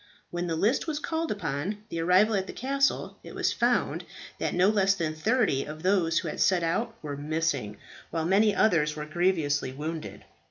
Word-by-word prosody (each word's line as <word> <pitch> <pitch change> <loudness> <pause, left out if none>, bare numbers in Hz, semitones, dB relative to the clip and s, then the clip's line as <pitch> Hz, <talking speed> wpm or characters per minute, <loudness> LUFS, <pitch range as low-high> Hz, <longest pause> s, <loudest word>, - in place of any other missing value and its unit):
When 175 0 -2
the 165 - -1
list 220 - +1
was 310 -2 -1
called 320 +2 -2
upon 200 +2 -3
the 165 - -4
arrival 185 +6 +4
at 190 -2 0
the - - -7
castle, 275 +2 0
it - - -10
was - - +1
found - - +1 0.4
that - - -1
no 180 +2 +4
less 200 -2 +3
than 165 -4 -2
thirty 200 - +1
of 155 +2 -8
those 180 -4 +2
who 170 - 0
had 150 - -3
set 180 -3 +3
out 225 +8 -1
were 145 -2 -4
missing, 145 -7 -2 0.3
while 165 -1 -2
many 200 +3 +3
others 150 -8 +3
were 150 0 -5
grievously 155 -5 0
wounded. 155 +3 -6
175 Hz, 190 wpm, -28 LUFS, 155-210 Hz, 0.4 s, arrival